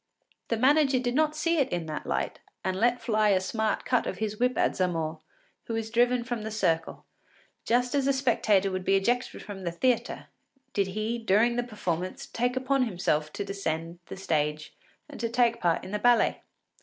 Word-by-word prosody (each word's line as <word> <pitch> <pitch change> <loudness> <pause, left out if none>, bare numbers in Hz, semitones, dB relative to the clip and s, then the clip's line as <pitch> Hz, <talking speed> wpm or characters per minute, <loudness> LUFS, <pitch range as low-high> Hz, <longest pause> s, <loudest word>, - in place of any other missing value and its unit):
The 230 - 0
manager 275 +2 +4
did 245 -1 -1
not 305 +2 +2
see 330 +1 +1
it 275 - +2
in 175 -2 -2
that 155 -1 -5
light, - - -2 0.3
and 185 0 0
let 240 +2 +3
fly 215 -2 +2
a 190 -2 +4
smart 220 +3 -1
cut 250 -2 +1
of - - -3
his 215 -1 -3
whip 250 +1 +1
at - - +2
Zamore, 165 -4 -1 0.5
who 230 - -3
was 225 0 -3
driven 245 +1 +3
from 240 -2 -4
the 220 - -4
circle, 165 -7 -1 0.6
just 245 +1 +1
as 275 -1 +1
a - - +5
spectator 220 -7 +2
would 185 0 -3
be 195 - +3
ejected 240 +6 0
from 195 -2 -8
the 170 - -2
theatre 245 +8 -1 0.4
did 200 -2 +1
he, 215 +4 -2
during 225 +2 +3
the 245 - +1
performance, 185 -7 -4
take 245 +2 -1
on 270 -2 +4
himself 155 -7 -1
to 205 - -3
ascend 170 -4 -4
to - - -7
the - - -12
stage 150 -4 -1 0.3
and - - -11
to 230 - -1
take 235 0 +2
part 170 -2 +1
in - - -8
the 210 - -1
ballet. 245 0 +3
220 Hz, 200 wpm, -28 LUFS, 185-245 Hz, 0.6 s, a